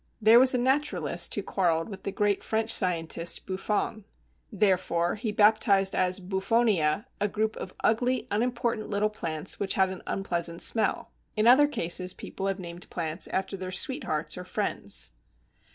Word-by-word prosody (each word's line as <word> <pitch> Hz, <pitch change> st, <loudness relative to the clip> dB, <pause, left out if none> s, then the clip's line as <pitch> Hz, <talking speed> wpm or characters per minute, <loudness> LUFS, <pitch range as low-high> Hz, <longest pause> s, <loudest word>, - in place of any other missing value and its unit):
There 225 Hz, +2 st, +7 dB
was 260 Hz, 0 st, +5 dB
a -, -, +3 dB
naturalist 240 Hz, -, 0 dB
who 205 Hz, -, -3 dB
quarrelled 170 Hz, -4 st, 0 dB
with 195 Hz, -3 st, -9 dB
the 200 Hz, -, -4 dB
great 205 Hz, 0 st, 0 dB
French 220 Hz, 0 st, 0 dB
scientist 165 Hz, -1 st, +2 dB
Buffon. 205 Hz, +2 st, -2 dB, 0.5 s
Therefore 185 Hz, -4 st, +1 dB
he 215 Hz, +1 st, -3 dB
baptized 205 Hz, -2 st, +3 dB
as 185 Hz, +1 st, +1 dB
Buffonia 195 Hz, -2 st, +1 dB
a 205 Hz, -, +1 dB
group 215 Hz, +1 st, -2 dB
of 185 Hz, -, -7 dB
ugly, 245 Hz, +3 st, +1 dB
unimportant 235 Hz, 0 st, -1 dB
little 210 Hz, +1 st, 0 dB
plants 160 Hz, -4 st, -4 dB
which 195 Hz, -1 st, -1 dB
had 190 Hz, -1 st, +3 dB
an 185 Hz, -1 st, -7 dB
unpleasant 170 Hz, -3 st, -2 dB
smell. 220 Hz, -2 st, 0 dB, 0.3 s
In 215 Hz, -, +2 dB
other 260 Hz, +5 st, +7 dB
cases 180 Hz, -, -1 dB
people 195 Hz, -, -6 dB
have 195 Hz, -1 st, -1 dB
named 175 Hz, -2 st, -8 dB
plants 165 Hz, 0 st, -3 dB
after 190 Hz, +1 st, -2 dB
their 185 Hz, -1 st, -5 dB
sweethearts 180 Hz, -, -1 dB
or -, -, -6 dB
friends. 180 Hz, -, -3 dB
195 Hz, 155 wpm, -27 LUFS, 180-220 Hz, 0.5 s, There